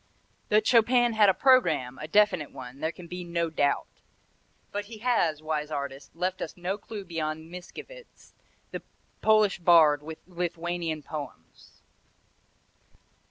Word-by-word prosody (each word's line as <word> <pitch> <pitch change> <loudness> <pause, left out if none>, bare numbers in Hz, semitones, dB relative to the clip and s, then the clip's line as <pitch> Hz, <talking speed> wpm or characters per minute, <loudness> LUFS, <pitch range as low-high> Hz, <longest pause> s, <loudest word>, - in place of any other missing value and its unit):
That 215 +1 +4
Chopin 240 0 +4
had 210 -2 +5
a - - +5
programme, 160 - +3
a 155 - -6
definite 185 -5 +3
one, 130 +1 -10
there 160 +2 -1
can 175 - -12
be 180 +1 -6
no 170 -1 -2
doubt; 145 -2 +1 0.9
but 205 0 -3
he 220 +1 -10
has, 190 -10 +1
wise 155 -1 -2
artist, 140 -1 -6
left 180 +2 -2
us 160 - -5
no 180 +2 -2
clue 210 -4 -8
beyond 160 -1 -4
Mickiewicz's, 475 - -11 0.4
the - - -5 0.4
Polish 215 -3 +4
bard 165 -4 +6 0.2
Lithuanian 170 -2 -3
poems. 150 -2 -9
175 Hz, 130 wpm, -28 LUFS, 155-210 Hz, 0.9 s, bard